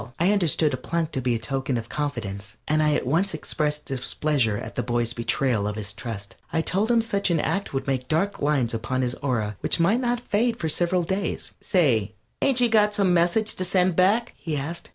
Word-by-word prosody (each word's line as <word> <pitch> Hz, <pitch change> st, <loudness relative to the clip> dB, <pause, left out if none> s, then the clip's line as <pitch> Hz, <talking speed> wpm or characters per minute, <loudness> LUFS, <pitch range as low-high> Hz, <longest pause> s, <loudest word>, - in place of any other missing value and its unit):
I 175 Hz, +4 st, +4 dB
understood 165 Hz, -6 st, +2 dB
a -, -, -1 dB
plunk 165 Hz, +3 st, -2 dB
to 135 Hz, -, -2 dB
be 125 Hz, -1 st, +1 dB
a -, -, +1 dB
token 130 Hz, +3 st, -2 dB
of 115 Hz, 0 st, -5 dB
confidence, 110 Hz, -8 st, -4 dB
and 155 Hz, 0 st, +2 dB
I 150 Hz, -1 st, +3 dB
at -, -, -1 dB
once 165 Hz, +7 st, +1 dB
expressed 150 Hz, -1 st, -2 dB
displeasure 135 Hz, -3 st, 0 dB
at -, -, -7 dB
the -, -, -1 dB
boy's 120 Hz, 0 st, 0 dB
betrayal 115 Hz, -2 st, 0 dB
of 105 Hz, -, -3 dB
his 105 Hz, -1 st, -5 dB
trust. 105 Hz, -2 st, -7 dB, 0.2 s
I 160 Hz, -, +1 dB
told 200 Hz, +7 st, 0 dB
him 235 Hz, -1 st, +4 dB
such 200 Hz, -3 st, 0 dB
an 170 Hz, -2 st, +2 dB
act 195 Hz, +6 st, -1 dB
would 135 Hz, -, -2 dB
make 130 Hz, -2 st, -1 dB
dark 180 Hz, +6 st, 0 dB
lines 140 Hz, -6 st, +1 dB
upon 115 Hz, +3 st, -1 dB
his 125 Hz, -1 st, -1 dB
aura 110 Hz, -7 st, -1 dB
which -, -, 0 dB
might 195 Hz, +8 st, +3 dB
not 245 Hz, -1 st, 0 dB
fade 235 Hz, 0 st, 0 dB
for 160 Hz, -, -2 dB
several 175 Hz, +3 st, +1 dB
days. 190 Hz, +4 st, -3 dB
"Say, 120 Hz, -, +2 dB, 0.3 s
ain't 270 Hz, -3 st, +3 dB
you 245 Hz, -, +6 dB
got 210 Hz, -2 st, +3 dB
some 195 Hz, -4 st, +3 dB
message 175 Hz, +6 st, +2 dB
to 185 Hz, -, -1 dB
send 180 Hz, -1 st, +2 dB
back?" 205 Hz, +7 st, +3 dB
he 155 Hz, -3 st, -3 dB
asked. 160 Hz, +5 st, -5 dB
150 Hz, 215 wpm, -25 LUFS, 120-190 Hz, 0.3 s, you